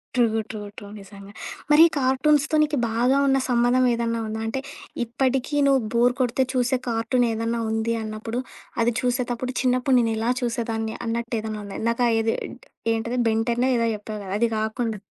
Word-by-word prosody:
True, 225 -3 +2
true, 215 - -6 0.2
true 205 - -9
నిజంగా. 200 0 -12 0.4
మరి 300 +2 +8
కార్టూన్స్‌తొ 285 +3 +2
నీకు 300 -1 -1
బాగా 245 +4 +2
ఉన్న 270 0 +4
సంబంధం 245 +1 +3
ఏదన్నా 230 0 -1
ఉందా? 220 +1 -4
అంటే, 245 +4 -2 0.5
ఇప్పటికి 260 +3 -1
నువ్వు 270 -2 +4
బోర్ 245 +1 +4
కొడితే 255 +1 +2
చూసే 255 0 +1
కార్టూన్ 230 +2 +1
ఏదన్నా 230 +1 -1
ఉంది 225 +1 0
అన్నప్పుడు, 220 +2 -4 0.4
అది 235 0 +2
చూసేటప్పుడు, 250 0 -1
చిన్నప్పుడు 255 +1 +2
నేను 230 -1 +1
ఎలా 225 +2 0
చూసేదాన్ని 230 -2 -2
అన్నట్టు 235 +1 -2
ఏదన్నా 215 -1 -5
ఉంద? 200 -1 -8
ఇందాక 235 +2 0 0.2
ఏది 225 0 +1 0.6
ఏంటది 230 +2 -2
'బెన్ 225 0 +2
టెన్నో' 240 +2 +1
ఏదో 230 - +1
చెప్పావు 210 +1 -7
కదా! 190 - -5
అది 235 - +3
కాకుండా? 220 +1 -2
235 Hz, 165 wpm, -24 LUFS, 225-255 Hz, 0.6 s, మరి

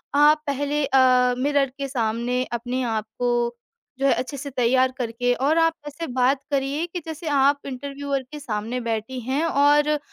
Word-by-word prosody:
आप 300 +1 +5
पहले 285 +1 -1
अ, 255 -2 +4
मिरर 280 +1 +1
के 275 -1 -3
सामने 240 0 -1
अपने 245 +2 -2
आप 220 -3 -1
को 240 -1 0 0.4
जो 275 - 0
है, - - +5
अच्छे 270 +3 -4
से 280 +1 -6
तैयार 255 0 +2
करके 245 0 0
और 280 +6 +1
आप 330 0 +4
ऐसे 295 +3 -6
बात 260 +2 +2
करिए 280 +4 0
कि 350 +1 -5
जैसे 320 +1 -7
आप 285 0 +3
इंटरव्यूअर 275 +1 -4
के 300 - -7
सामने 230 -2 -3
बैठी 230 +2 -3
हैं 265 +6 -1
और 295 0 +3
270 Hz, 170 wpm, -23 LUFS, 245-290 Hz, 0.4 s, आप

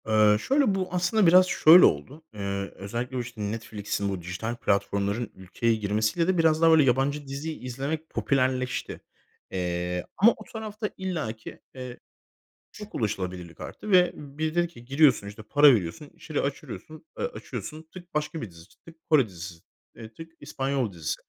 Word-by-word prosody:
Eee, 105 -1 +5
şöyle, 265 - +2
bu 185 -1 -1
aslında 180 +3 +2
biraz 185 +2 +7
şöyle 170 0 +8
oldu. 135 - -1
Eee, 100 -1 -4
özellikle 120 +6 -4
o, - - 0
işte, 120 -2 -6
Netflix'in 105 -1 -3
bu 95 -2 -4
dijital 90 +7 -4
platformların 100 +1 -1
ülkeye 105 +5 -1
girmesiyle 110 - 0
de 185 -1 +2
biraz 160 -1 +3
daha, 165 0 +6
böyle, 160 -2 +6
yabancı 135 +3 +1
dizi 140 +4 -4
izlemek 140 +6 -4
popülerleşti. 130 -1 -1 0.5
Eee, 90 -1 -2
ama 225 +4 +7
o 215 - -11
tarafta 215 -1 -4
illaki, 155 -13 -5 0.2
eee, 125 -1 -8 0.7
çok 210 0 -10
ulaşılabilirlik 90 -6 -4
arttı. 215 - -7
Ve 180 -1 +6
biri 150 +3 -4
dedi 175 0 +2
ki: 120 -8 -15
"Giriyorsun, 135 -5 +3
işte, 105 +2 -9
para 145 +6 +6
veriyorsun. 105 - -4
İçeriği 155 -2 -4
açırıyosun 155 - -7
eee, - - 0
açıyorsun. 160 - -7
Tık 175 -1 -12
başka 150 +1 -2
bir 105 - -7
dizi, 85 0 -15 0.2
tık 165 - -13
Kore 145 -7 +5
dizisi, 85 -3 -9 0.4
eee, 115 0 -11
tık 165 +6 -11
İspanyol 135 -6 -2
dizisi." 80 -3 -3
130 Hz, 160 wpm, -26 LUFS, 105-160 Hz, 0.7 s, şöyle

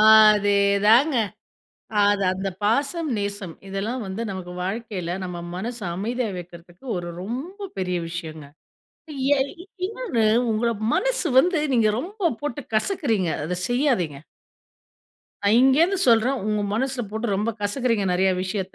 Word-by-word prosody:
அதே 215 -2 +7 0.3
தாங்க. 255 +6 +5 0.9
அது 205 0 +3
அந்த 190 +1 -3
பாசம், 280 +9 +1
நேசம். 200 -4 -4
இதெல்லாம் 210 +6 -3
வந்து 190 +4 -4
நமக்கு 180 -2 -6
வாழ்க்கையில, 195 -3 -4
நம்ம 180 -1 -5 0.2
மனசு 230 +4 -5
அமைதியா 230 +4 -2
வைக்கிறதுக்கு, 175 +1 -12
ஒரு 175 0 -5
ரொம்ப 325 - -5
பெரிய 180 -1 -1
விஷயங்க. 160 -3 -6 0.9
எ - - 0 0.5
இன்னொன்னு 410 - -1 0.3
உங்கள 230 +2 +1 0.2
மனசு - - +1
வந்து 345 +4 +4
நீங்க 225 -3 +4
ரொம்ப 375 - -1
போட்டு 290 -1 -3
கசக்குறீங்க. 225 - +1 0.2
அத 180 - -2 0.2
செய்யாதீங்க. 245 - +1 1.3
நான் 205 +3 +5
இங்கேருந்து 315 +9 +4
சொல்றேன், 240 +4 +4
உங்க 210 -1 0
மனசுல 260 +2 -1
போட்டு 220 +2 -3
ரொம்ப 215 +3 0
கசக்குறீங்க 220 0 0
நெறைய 190 +1 +3
விஷயத்த. 190 0 -4
220 Hz, 125 wpm, -24 LUFS, 190-265 Hz, 1.3 s, அதே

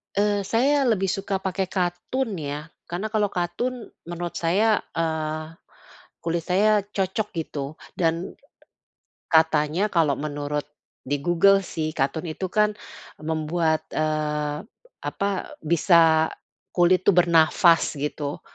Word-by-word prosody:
Eee, 205 -1 +1
saya 270 +3 +3
lebih 195 -5 +2
suka 195 -1 -2
pakai 190 0 -1
katun 185 +5 -2
ya. 150 +2 -5 0.2
Karena 195 +5 -4
kalau 215 -2 +2
katun 200 +7 -3 0.2
menurut 175 0 -4
saya, 205 +6 +3 0.2
eee, 155 -1 -2 0.7
kulit 170 0 -2
saya 205 +5 +3
cocok 200 +1 -2
gitu 150 -1 -4 0.2
dan 165 0 -1 1.0
katanya 160 +4 +2
kalau 155 -6 +3
menurut 145 0 -3 0.4
di 140 +1 -1
Google 175 +5 +4
sih, 155 -4 -4
katun 140 +5 -1
itu 175 +3 -4
kan 210 +2 +2 0.5
membuat, 160 +1 0
eee, 150 0 -1 0.4
apa, 200 -1 -2
bisa 160 -1 +4 0.4
kulit 180 +1 +3
tuh 200 - +6
bernafas 170 0 +4
gitu. 145 0 -4
170 Hz, 115 wpm, -24 LUFS, 155-195 Hz, 1.0 s, tuh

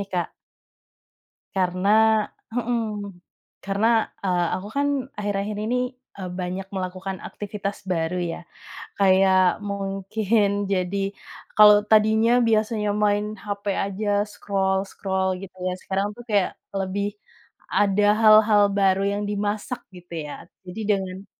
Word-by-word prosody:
nih, 200 - -5
Kak. 180 -3 -2 1.3
Karena 185 +1 0 0.7
heeh, 240 -1 0 0.8
karena 200 +3 0 0.4
eee, 180 -2 +1
aku 190 +2 -5
kan 285 0 +2 0.3
akhir-akhir 205 0 -2
ini, 240 +3 0 0.4
eee, 185 -2 -5
banyak 185 +1 -4
melakukan 185 0 -4
aktivitas 205 -1 -5
baru 170 -1 -1 0.2
ya, - - -6 0.6
kayak 190 -1 +4
mungkin 200 +2 0 0.2
jadi 185 +1 0 0.6
kalau 210 -1 +9
tadinya 220 +1 +4 0.2
biasanya 215 -1 +1 0.2
main 205 0 +2 0.2
HP 205 0 -5 0.2
aja 200 +2 -3 0.2
scroll-scroll 190 -1 -1
gitu 190 -1 -11
ya, 185 - 0
sekarang 195 +1 -1
tuh 240 - -10
kayak 200 -3 +2 0.3
lebih 195 +1 -1 0.7
ada 205 0 +3 0.2
hal-hal 215 -1 +6 0.2
baru 195 -1 +3
yang 205 +1 -2
dimasak 210 +4 -2 0.2
gitu 175 -1 -11
ya, 145 - -7 0.3
jadi 180 +4 -7
dengan 190 0 -5
200 Hz, 115 wpm, -24 LUFS, 190-210 Hz, 1.3 s, kalau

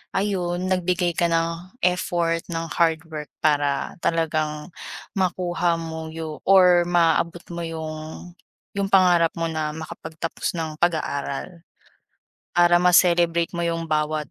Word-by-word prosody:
ayun, 180 -3 -1
nagbigay 180 -1 +1
ka 170 - +3
ng 165 +4 -2
effort 175 -2 +1
ng 165 0 -3
hard 160 -1 +2
work, 150 -1 -5 0.2
para 145 0 +1
talagang 155 -1 -1 0.4
makuha 180 -2 0
mo 160 -1 -6
yu 160 -1 -6
or 180 -2 +6
maabot 170 0 +2
mo 170 0 -4
'yung, 160 +1 -7 0.5
'yung 200 - +1
pangarap 175 -3 +5
mo 165 - 0
na 155 -1 -2
makapagtapos 160 0 -5
ng 160 -1 -4
pag-aaral. 165 0 -2 0.9
Para 175 0 +5
ma-celebrate 175 -1 +4
mo 170 0 -2
yung 165 -1 -3
bawat 150 -2 -1
165 Hz, 120 wpm, -23 LUFS, 160-175 Hz, 0.9 s, or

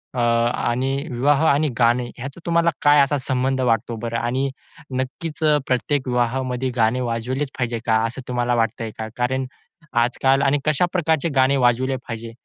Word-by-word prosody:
अ, - - -1
आणि 120 +3 0
विवाह 135 +4 +2
आणि 145 +2 +3
गाणे 120 +1 +3
ह्याचा 135 +6 -7
तुम्हाला 170 0 +3
काय 145 0 +5
असा 140 +1 +2
संबंध 130 0 -1
वाटतो 115 -1 0
बरं? 115 -1 -2
आणि 130 +4 -1 0.5
नक्कीच 135 +5 -4 0.3
प्रत्येक 130 +2 0
विवाहामध्ये 125 +1 -1
गाणे 115 +1 +2
वाजवलेच 125 +4 -2
पाहिजे 120 -3 -2
का, 115 -3 +3
असं 125 +4 -7
तुम्हाला 120 -1 0
वाटतंय 115 -1 -1
का? 110 - -4
कारण 130 +2 0 0.6
आजकाल 135 +2 +2
आणि 140 +1 +3
कशा 155 +3 +2
प्रकारचे 160 -3 +1
गाणे 135 +1 +4
वाजविले 130 +1 +2
पाहिजे? 115 0 -6
130 Hz, 155 wpm, -22 LUFS, 120-135 Hz, 0.6 s, काय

